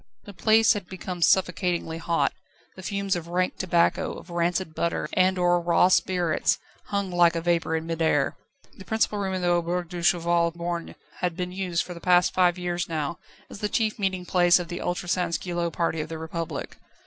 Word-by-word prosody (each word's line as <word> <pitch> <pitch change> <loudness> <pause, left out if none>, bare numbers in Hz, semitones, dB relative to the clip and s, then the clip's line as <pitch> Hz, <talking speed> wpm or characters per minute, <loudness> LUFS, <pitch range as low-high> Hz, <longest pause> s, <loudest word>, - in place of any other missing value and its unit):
The 205 - -11
place 220 +3 +4
had 200 -4 -6
become 185 -1 -6
suffocatingly 180 -2 +1
hot; 165 0 0 0.4
the 185 - -10
fumes 200 0 -1
of 170 -1 -5
rank 180 +1 -1
tobacco, 175 0 +1
of 175 - -11
rancid 170 0 -1
butter, 170 +1 -1
and 185 0 +3
of 180 - 0
raw 175 0 +4
spirits 180 -3 +2 0.3
hung 200 -2 -2
like 175 -1 +4
a - - 0
vapour 170 -1 +1
in 160 0 -2
mid 165 0 -4
air. 145 -3 +2 0.4
The 190 - -11
principal 220 0 0
room 190 -1 -2
in 185 - -3
the 175 - +2
"Auberge 175 0 0
du 175 -1 -5
Cheval 170 0 +2
Borgne" 170 0 -4 0.2
had 180 -2 -2
been 180 -1 -3
used 180 -2 -1
for 180 - -8
the 170 - -11
past 180 0 +4
five 180 -1 +3
years 175 -1 -2
now 155 0 -3 0.3
as - - -10
the 210 - -1
chief 220 -1 0
meeting 190 -2 -1
place 175 -1 +4
of 175 -2 -5
the 175 0 -5
ultra 175 0 -3
sansculotte 175 -1 -1
party 165 -1 -1
of 155 - -6
the 165 - -5
Republic. 160 +1 -5
175 Hz, 195 wpm, -25 LUFS, 170-185 Hz, 0.4 s, place